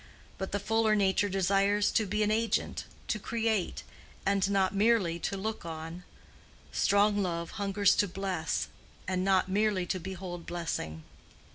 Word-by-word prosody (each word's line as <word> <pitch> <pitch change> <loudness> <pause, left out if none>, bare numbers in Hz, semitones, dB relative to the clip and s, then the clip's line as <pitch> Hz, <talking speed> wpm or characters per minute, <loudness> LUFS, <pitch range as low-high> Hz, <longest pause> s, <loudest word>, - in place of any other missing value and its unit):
But 190 - -3
the 205 - 0
fuller 220 +1 +2
nature 200 0 +2
desires 195 +2 +2
to 220 - +1
be 210 +2 +1
an 210 - +1
agent, 225 -1 0 0.2
to 215 - -1
create, 225 -3 -1 0.4
and 195 0 +2
not 195 -1 +2
merely 200 -5 +2
to 195 - -2
look 220 +3 -3
on: 165 +2 -7 0.7
strong 205 0 +3
love 170 -3 -2
hungers 200 0 +3
to 205 - +3
bless, 185 -3 -2 0.4
and 185 0 0
not 190 -1 +3
merely 200 -1 +1
to 185 +1 -2
behold 180 -1 -6
blessing. 120 - -4
195 Hz, 145 wpm, -30 LUFS, 180-210 Hz, 0.7 s, strong